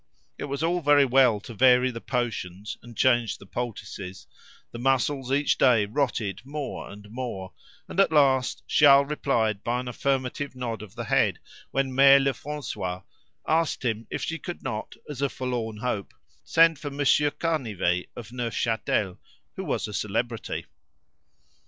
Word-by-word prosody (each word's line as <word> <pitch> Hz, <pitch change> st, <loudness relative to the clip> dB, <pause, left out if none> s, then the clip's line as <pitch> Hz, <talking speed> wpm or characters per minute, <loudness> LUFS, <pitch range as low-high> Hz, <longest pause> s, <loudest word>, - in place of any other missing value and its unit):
It -, -, -3 dB
was 140 Hz, +2 st, -3 dB
all 175 Hz, +2 st, +1 dB
very 145 Hz, -2 st, +5 dB
well 125 Hz, -4 st, +4 dB
to 115 Hz, -, -9 dB
vary 125 Hz, +2 st, +5 dB
the 115 Hz, -1 st, -7 dB
potions 105 Hz, -6 st, -3 dB
and 120 Hz, -1 st, -13 dB
change 120 Hz, -4 st, +3 dB
the -, -, -14 dB
poultices; 100 Hz, -4 st, -6 dB, 0.5 s
the 120 Hz, -, -7 dB
muscles 135 Hz, +1 st, +1 dB
each 145 Hz, +1 st, +2 dB
day 120 Hz, -6 st, +5 dB
rotted 110 Hz, -4 st, -1 dB
more 145 Hz, +1 st, -5 dB
and 105 Hz, 0 st, -11 dB
more; 115 Hz, -7 st, -5 dB, 0.3 s
and -, -, -4 dB
at 195 Hz, -, +5 dB
last 135 Hz, -4 st, +3 dB
Charles 140 Hz, -1 st, +6 dB
replied 110 Hz, -8 st, 0 dB
by 120 Hz, +1 st, 0 dB
an 125 Hz, -, -5 dB
affirmative 135 Hz, +2 st, -2 dB
nod 120 Hz, -4 st, -4 dB
of 110 Hz, -1 st, -11 dB
the 120 Hz, -, -4 dB
head 110 Hz, -, +2 dB, 0.3 s
when 135 Hz, -1 st, -1 dB
Mere 135 Hz, +1 st, +8 dB
Lefrancois, 135 Hz, -9 st, -3 dB, 0.4 s
asked 160 Hz, -4 st, +1 dB
him 115 Hz, -1 st, -1 dB
if -, -, -4 dB
she 165 Hz, 0 st, -3 dB
could 175 Hz, -, -7 dB
not, 110 Hz, 0 st, -4 dB
as 145 Hz, -3 st, -6 dB
a 140 Hz, -, +2 dB
forlorn 120 Hz, -5 st, -3 dB
hope, 110 Hz, -3 st, -3 dB, 0.3 s
send 165 Hz, -2 st, +4 dB
for 145 Hz, -, -5 dB
Monsieur 145 Hz, +1 st, +3 dB
Canivet 110 Hz, -, -1 dB
of 115 Hz, -3 st, -8 dB
Neufchâtel, 115 Hz, -5 st, -1 dB, 0.4 s
who -, -, -4 dB
was -, -, -2 dB
a 105 Hz, -, -8 dB
celebrity. 115 Hz, +3 st, -2 dB
125 Hz, 155 wpm, -26 LUFS, 110-140 Hz, 0.5 s, Mere